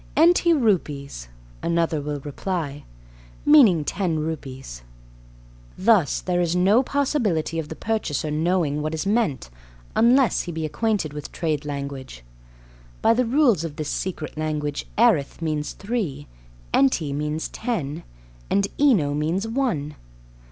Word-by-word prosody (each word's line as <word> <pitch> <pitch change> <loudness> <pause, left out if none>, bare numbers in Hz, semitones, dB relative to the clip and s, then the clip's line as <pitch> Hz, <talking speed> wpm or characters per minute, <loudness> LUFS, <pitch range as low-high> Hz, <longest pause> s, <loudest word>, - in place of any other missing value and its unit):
"Enty 340 +2 +5
rupees," 150 - 0 0.3
another 165 -2 0
will 145 0 -4
reply, 145 -1 -4 0.6
meaning 240 - +6
"ten 175 -3 -1
rupees." 135 - -5 1.0
Thus, 195 - +3
there 180 -1 0
is 175 0 0
no 195 +7 +4
possibility 240 - 0
of 155 - -5
the 160 - -6
purchaser 160 - -2
knowing 155 -2 0
what 155 +1 -2
is 160 - -3
meant 195 - 0 0.4
unless 245 -1 +4
he 175 - -6
be 160 -1 -3
acquainted 195 -2 -1
with 150 -1 -7
trade 155 -3 -2
language. 140 - -6 0.8
By 225 - +6
the 250 +2 +1
rules 240 - +3
of 160 -3 -5
this 150 -1 -4
secret 170 -5 -4
language 150 -2 -3
erith 215 - +3
means 155 -3 -2
"three," 195 - -3 0.5
enty 140 +2 +2
means 150 +2 -2
"ten," 165 - -3 0.5
and 200 0 +2
eno 210 - +4
means 165 +8 -1
"one." 225 - -1
165 Hz, 130 wpm, -23 LUFS, 150-220 Hz, 1.0 s, meaning